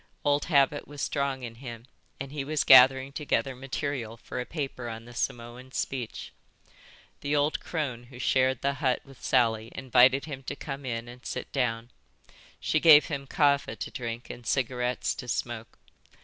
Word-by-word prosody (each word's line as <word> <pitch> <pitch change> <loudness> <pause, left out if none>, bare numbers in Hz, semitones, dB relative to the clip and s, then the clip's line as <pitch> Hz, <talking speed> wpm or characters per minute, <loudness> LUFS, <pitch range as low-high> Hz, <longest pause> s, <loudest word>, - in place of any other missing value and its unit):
Old 145 0 +2
habit 145 -2 +2
was 145 0 -10
strong 140 -2 -1
in 115 -2 -6
him 120 -3 -8 0.3
and 135 0 -6
he 145 -2 -3
was 150 +1 0
gathering 130 +1 +7
together 140 -2 -1
material 130 -3 -4
for 125 - -5
a 125 - -7
paper 135 -6 -4
on 115 0 -7
the 120 - -12
Samoan 120 +2 -4
speech. 130 -3 -4 0.9
The 145 +1 -1
old 145 +1 +1
crone 135 -8 -4
who 125 +1 -13
shared 130 0 +2
the 140 0 +2
hut 130 -3 +1
with 135 -2 -16
Sally 115 -3 +2
invited 130 +1 +4
him 140 -4 -6
to 145 - -4
come 140 -2 -6
in 115 -1 -3
and 125 +1 -12
sit - - -5
down. 120 -3 -1 0.7
She 155 - +1
gave 155 -2 +8
him 140 -3 -4
kava 140 -1 +2
to - - -6
drink 120 -1 -5
and 120 - -10
cigarettes 125 0 0
to 125 - -8
smoke. 120 -1 -4
130 Hz, 170 wpm, -28 LUFS, 120-140 Hz, 0.9 s, gave